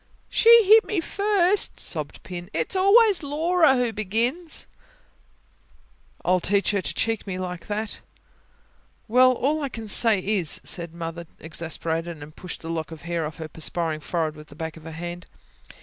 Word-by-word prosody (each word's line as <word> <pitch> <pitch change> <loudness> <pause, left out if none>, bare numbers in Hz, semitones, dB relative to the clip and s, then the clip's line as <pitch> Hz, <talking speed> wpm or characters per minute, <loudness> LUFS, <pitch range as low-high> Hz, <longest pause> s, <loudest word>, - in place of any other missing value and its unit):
"She 465 0 +7
hit 435 +3 +7
me 420 - -2
first," 400 +2 +1
sobbed 155 -4 -5
Pin. 175 0 -7
"It's - - -1
always 400 +1 +5
Laura 315 +1 +3
who 245 -3 0
begins." 235 - -2 1.6
"I'll 185 +1 +3
teach 200 +3 +1
her 200 -2 0
to - - -2
cheek 225 -2 -1
me 185 -2 -3
like 180 -2 -5
that!" 210 +1 -3 1.1
"Well, 255 +3 +6
all 285 +5 0
I 280 - -2
can 225 -3 -7
say 220 +1 +4
is," 190 -4 0
said 170 -2 -4
Mother 170 0 -6
exasperated, 165 0 -4
and 150 +1 -13
pushed 180 -2 -8
a - - -7
lock 165 -1 -3
of 160 - -10
hair 170 -2 -2
off 150 - -10
her 160 - -6
perspiring 160 0 -2
forehead 160 0 -2
with 150 0 -12
the 145 - -14
back 160 +1 -5
of 160 -1 -14
her 165 - -7
hand. 175 +2 -7
185 Hz, 165 wpm, -24 LUFS, 165-275 Hz, 1.6 s, She